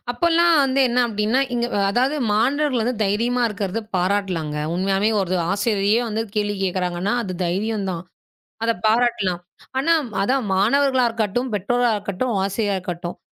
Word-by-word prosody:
அப்பல்லாம் 340 Hz, +4 st, +3 dB
வந்து 270 Hz, 0 st, +1 dB
என்ன 240 Hz, +1 st, 0 dB
அப்டின்னா, 215 Hz, +3 st, 0 dB
இங் 240 Hz, 0 st, 0 dB, 0.3 s
அதாவது 255 Hz, +7 st, +1 dB, 0.2 s
மாணவர்கள் 260 Hz, +3 st, +1 dB
வந்து 245 Hz, +3 st, -1 dB
தைரியமா 235 Hz, +5 st, 0 dB
இருக்கிறதை 205 Hz, 0 st, -3 dB, 0.2 s
பாராட்டலாங்க. 180 Hz, -5 st, -1 dB, 0.2 s
உண்மையாவே 195 Hz, +3 st, +1 dB
ஒரு 185 Hz, -1 st, -1 dB, 0.2 s
ஆசிரியரே 205 Hz, +2 st, +1 dB
வந்து 220 Hz, +1 st, -1 dB
கேள்வி 205 Hz, -1 st, 0 dB
கேக்குறாங்கன்னா, 180 Hz, +1 st, -1 dB
அது 185 Hz, -4 st, -5 dB
தைரியம்தான். 195 Hz, -1 st, -2 dB, 0.6 s
அத 230 Hz, -, +3 dB
பாராட்டலாம். 215 Hz, -6 st, +1 dB, 0.4 s
ஆனா 290 Hz, +5 st, +2 dB, 0.3 s
அதான் 255 Hz, +5 st, +1 dB
மாணவர்களா 260 Hz, +6 st, +3 dB
இருக்கட்டும், 230 Hz, +2 st, -1 dB
பெற்றோரா 245 Hz, +5 st, +1 dB
இருக்கட்டும், 205 Hz, +4 st, -3 dB
ஆசிரியரா 200 Hz, +1 st, -1 dB
இருக்கட்டும். 175 Hz, -1 st, -5 dB
210 Hz, 130 wpm, -21 LUFS, 195-245 Hz, 0.6 s, அப்பல்லாம்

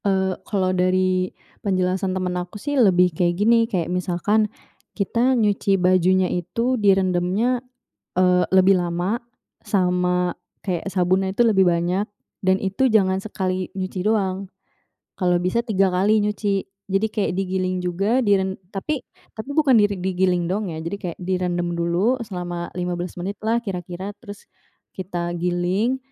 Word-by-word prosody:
Eee, 190 Hz, -1 st, +1 dB, 0.2 s
kalau 185 Hz, -3 st, +1 dB
dari 185 Hz, 0 st, +2 dB, 0.3 s
penjelasan 185 Hz, -1 st, 0 dB
temen 180 Hz, -1 st, -2 dB
aku 180 Hz, +3 st, -5 dB
sih 290 Hz, +8 st, -4 dB
lebih 180 Hz, -, +4 dB
kayak 175 Hz, +1 st, +1 dB
gini, 230 Hz, +2 st, +3 dB
kayak 180 Hz, -7 st, 0 dB
misalkan 185 Hz, +4 st, +1 dB, 0.5 s
kita 235 Hz, +5 st, +2 dB
nyuci 205 Hz, -3 st, +2 dB
bajunya 185 Hz, 0 st, +3 dB
itu 230 Hz, +9 st, -1 dB
direndamnya, 195 Hz, +5 st, +2 dB, 0.6 s
eee, 180 Hz, -1 st, +4 dB
lebih 190 Hz, 0 st, +5 dB
lama 175 Hz, +6 st, -1 dB, 0.4 s
sama 180 Hz, -2 st, +1 dB, 0.3 s
kayak 185 Hz, -1 st, -2 dB
sabunnya 190 Hz, +1 st, +1 dB
itu 240 Hz, -, +4 dB
lebih 195 Hz, -5 st, +4 dB
banyak, 175 Hz, +5 st, 0 dB, 0.3 s
dan 190 Hz, 0 st, +3 dB
itu 195 Hz, +8 st, +1 dB
jangan 190 Hz, -4 st, +3 dB
sekali 185 Hz, -3 st, -3 dB
nyuci 185 Hz, 0 st, -3 dB
doang, 195 Hz, -3 st, 0 dB, 0.7 s
kalau 180 Hz, -2 st, +2 dB
bisa 230 Hz, +7 st, 0 dB
3 195 Hz, -4 st, +2 dB
kali 205 Hz, +4 st, +3 dB
nyuci. 205 Hz, -1 st, 0 dB, 0.2 s
Jadi 195 Hz, +2 st, +1 dB
kayak 205 Hz, -4 st, -1 dB
digiling 185 Hz, -1 st, -1 dB
juga, 195 Hz, +8 st, +1 dB
di 205 Hz, -3 st, +4 dB
ren 190 Hz, 0 st, -1 dB, 0.2 s
tapi 245 Hz, +8 st, -3 dB, 0.3 s
tapi 220 Hz, +6 st, -7 dB
bukan 285 Hz, -2 st, +3 dB, 0.2 s
digiling 180 Hz, -1 st, +1 dB
dong 195 Hz, +2 st, -2 dB
ya, 160 Hz, -, -6 dB
jadi 165 Hz, +4 st, -4 dB
kayak 175 Hz, -3 st, -5 dB
direndam 175 Hz, -1 st, -1 dB
dulu 175 Hz, +9 st, +1 dB
selama 175 Hz, -4 st, -5 dB
15 175 Hz, 0 st, -3 dB
menit 190 Hz, +3 st, -3 dB
lah 225 Hz, +2 st, +2 dB
kira-kira, 190 Hz, -2 st, -5 dB
terus 205 Hz, -3 st, -11 dB, 0.5 s
kita 175 Hz, -2 st, -4 dB
giling. 180 Hz, +8 st, 0 dB
185 Hz, 140 wpm, -22 LUFS, 180-205 Hz, 0.7 s, lebih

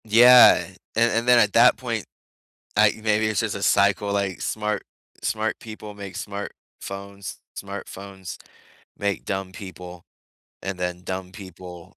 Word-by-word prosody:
Yeah. 120 Hz, +3 st, +8 dB, 0.3 s
And 115 Hz, +1 st, +3 dB
and 115 Hz, +1 st, 0 dB
then 125 Hz, -1 st, +7 dB
at 105 Hz, -2 st, +3 dB
that -, -, +6 dB
point, -, -, -3 dB, 0.7 s
I -, -, +5 dB
maybe 110 Hz, 0 st, +2 dB
it's 110 Hz, -2 st, 0 dB
just -, -, -2 dB
a -, -, -6 dB
cycle. 100 Hz, -1 st, +3 dB
Like, 100 Hz, -3 st, -1 dB
smart 105 Hz, -1 st, -2 dB, 0.4 s
smart -, -, -1 dB
people 110 Hz, -1 st, -9 dB
make 100 Hz, -2 st, -8 dB
smart 100 Hz, 0 st, -5 dB, 0.3 s
phones. 100 Hz, 0 st, -7 dB, 0.2 s
Smartphones 100 Hz, -1 st, -8 dB, 0.6 s
make 100 Hz, -1 st, -2 dB
dumb 95 Hz, -1 st, -3 dB
people, 90 Hz, -2 st, -10 dB, 0.6 s
and 95 Hz, -1 st, -4 dB
then 90 Hz, 0 st, -3 dB
dumb 95 Hz, 0 st, -5 dB
people 90 Hz, -3 st, -11 dB
100 Hz, 140 wpm, -24 LUFS, 95-105 Hz, 0.7 s, Yeah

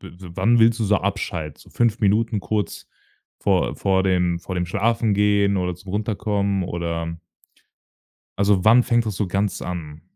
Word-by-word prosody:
w 90 Hz, +1 st, -11 dB
wann 120 Hz, +1 st, +3 dB
willst 115 Hz, +1 st, +4 dB
du -, -, +1 dB
so 105 Hz, 0 st, +3 dB
abschalten? 85 Hz, -6 st, -3 dB
So -, -, -18 dB
5 115 Hz, -1 st, +1 dB
Minuten 110 Hz, +1 st, +1 dB
kurz 105 Hz, -3 st, -3 dB, 0.5 s
vor -, -, +1 dB
vor 95 Hz, -1 st, +1 dB
dem 90 Hz, -2 st, +1 dB
vor 90 Hz, +2 st, -7 dB
dem 90 Hz, 0 st, -1 dB
schlafen 110 Hz, +3 st, +1 dB
gehen 100 Hz, -1 st, +2 dB
oder 90 Hz, -1 st, -1 dB
zum 90 Hz, +2 st, -12 dB
Runterkommen 100 Hz, -2 st, -1 dB
oder 85 Hz, -1 st, -4 dB, 1.2 s
Also, 100 Hz, -2 st, +2 dB
wann 115 Hz, +3 st, +6 dB
fängt 120 Hz, -2 st, +1 dB
das 105 Hz, -, -3 dB
so 105 Hz, -, -1 dB
ganz 100 Hz, +2 st, -1 dB
an? 80 Hz, -4 st, -6 dB
100 Hz, 165 wpm, -22 LUFS, 90-110 Hz, 1.2 s, wann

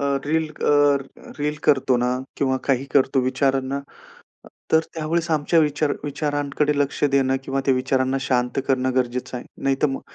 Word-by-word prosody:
अ, -, -, -1 dB, 0.2 s
reel 160 Hz, +1 st, 0 dB, 0.2 s
अ, -, -, +4 dB, 0.7 s
reel 150 Hz, +1 st, -1 dB
करतो 130 Hz, -3 st, +3 dB
ना 125 Hz, -, +1 dB, 0.3 s
किंवा 130 Hz, -2 st, +1 dB
काही 135 Hz, -1 st, +1 dB
करतो 135 Hz, -1 st, +3 dB
विचारांना, 135 Hz, +1 st, 0 dB
अ, -, -, -3 dB, 0.9 s
तर 160 Hz, -, +6 dB, 0.2 s
त्यावेळेस 165 Hz, +2 st, -1 dB
आमच्या 155 Hz, +2 st, +2 dB
विचार 150 Hz, -1 st, +1 dB
विचारांकडे 145 Hz, 0 st, -1 dB
लक्ष 145 Hz, +1 st, -1 dB
देणं 135 Hz, -1 st, +2 dB
किंवा 135 Hz, +1 st, -2 dB
त्या 135 Hz, -, +4 dB
विचारांना 130 Hz, +1 st, 0 dB
शांत 125 Hz, -1 st, 0 dB
करणं 130 Hz, -1 st, +1 dB
गरजेचं 125 Hz, 0 st, -1 dB
आहे. 120 Hz, -, -9 dB, 0.2 s
नाहीतर 135 Hz, +2 st, +2 dB
मग 135 Hz, -, -4 dB
135 Hz, 160 wpm, -22 LUFS, 130-150 Hz, 0.9 s, तर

